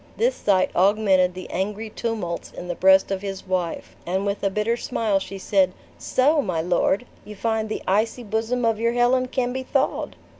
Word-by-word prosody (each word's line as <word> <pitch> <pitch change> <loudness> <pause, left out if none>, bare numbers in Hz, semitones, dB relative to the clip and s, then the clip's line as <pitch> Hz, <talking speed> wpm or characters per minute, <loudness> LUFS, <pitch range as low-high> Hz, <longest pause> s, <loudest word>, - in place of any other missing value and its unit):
This - - +2
sight 190 -2 +1
augmented 190 -2 +3
the 185 - -7
angry 210 +4 -3
tumults 210 -9 -4
in 180 - -8
the 175 - -2
breast 190 +2 +4
of 190 -1 -2
his 195 -1 -6
wife; 180 -3 -3
and 190 +3 -1
with 200 0 -2
a 195 - +3
bitter 210 +4 0
smile 220 -4 0
she 195 0 -7
said, 190 -1 +2 0.3
"So, 290 +4 +2
my 180 -9 -2
lord, 180 +6 +1 0.2
you 210 - -10
find 220 +1 -1
the - - -4
icy 220 +5 +1
bosom 225 +3 -1
of 225 -2 +1
your 230 +1 +1
Helen 250 +1 +2
can 250 -1 -1
be 260 - -3
thawed!" 260 - -1
210 Hz, 190 wpm, -23 LUFS, 190-230 Hz, 0.3 s, breast